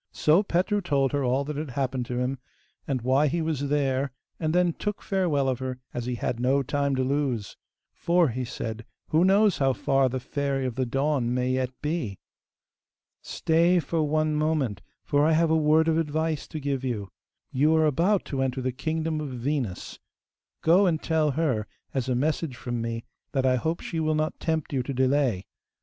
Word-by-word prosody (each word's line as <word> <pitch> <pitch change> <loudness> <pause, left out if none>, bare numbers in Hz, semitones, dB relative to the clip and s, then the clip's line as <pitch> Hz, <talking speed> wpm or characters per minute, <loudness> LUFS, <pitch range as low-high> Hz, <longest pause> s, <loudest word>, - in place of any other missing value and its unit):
So 155 +5 +4
Petru 200 +2 0
told 140 -6 +1
her 145 -1 0
all 130 +2 +1
that 150 0 -4
had 150 -1 -4
happened 130 -1 -2
to 125 - -3
him, 125 +1 -1 0.5
and 130 -4 -1
why 135 +4 +3
he 170 +5 0
was 155 -4 -1
there, 140 -2 +1 0.3
and 155 -2 0
then 175 0 +3
took 210 +4 -3
farewell 170 -8 +1
of 130 -2 0
her, 130 -1 -4 0.2
as 120 0 -4
he 125 - -1
had 120 0 -2
no 135 +3 +2
time 140 0 0
to 130 - +1
lose. 130 -6 -1 0.4
'For,' 170 -2 +2
he 125 +2 -3
said, 115 -1 -5 0.3
'who 160 +3 +3
knows 195 +1 +4
how 135 -1 +3
far 135 +3 +2
the 130 +1 -3
Fairy 135 0 -2
of 125 - -2
the 130 +1 -1
Dawn 135 -1 0
may 125 0 0
yet 130 -1 0
be?' 150 - -2 1.0
'Stay 170 +3 +2
for 165 +1 -1
one 155 +1 +1
moment, 150 - 0 0.2
for 145 0 +2
I 160 +1 +4
have 160 0 +3
a - - +4
word 155 +1 +4
of 160 0 +3
advice 160 -1 -1
to 155 - -6
give 140 -2 -2
you. 105 -7 -3 0.4
You 150 +5 +3
are 160 0 +4
about 170 +7 +2
to 135 -2 -2
enter 130 0 -1
the 130 - 0
kingdom 160 +3 -2
of 150 - -4
Venus;(4) 125 -5 -3 0.6
go 180 +5 +5
and 160 -3 +1
tell 160 -2 +1
her, 135 -8 0 0.3
as 130 -2 -1
a 125 - +1
message 150 +1 -1
from 120 -2 -4
me, 115 0 -3 0.3
that 135 -2 +1
I 130 -1 +4
hope 160 +7 -2
she 165 - -4
will 155 -1 +1
not 155 0 -1
tempt 160 -3 -2
you 135 - +1
to 135 +2 -4
delay. 130 -6 +1
140 Hz, 200 wpm, -26 LUFS, 130-160 Hz, 1.0 s, go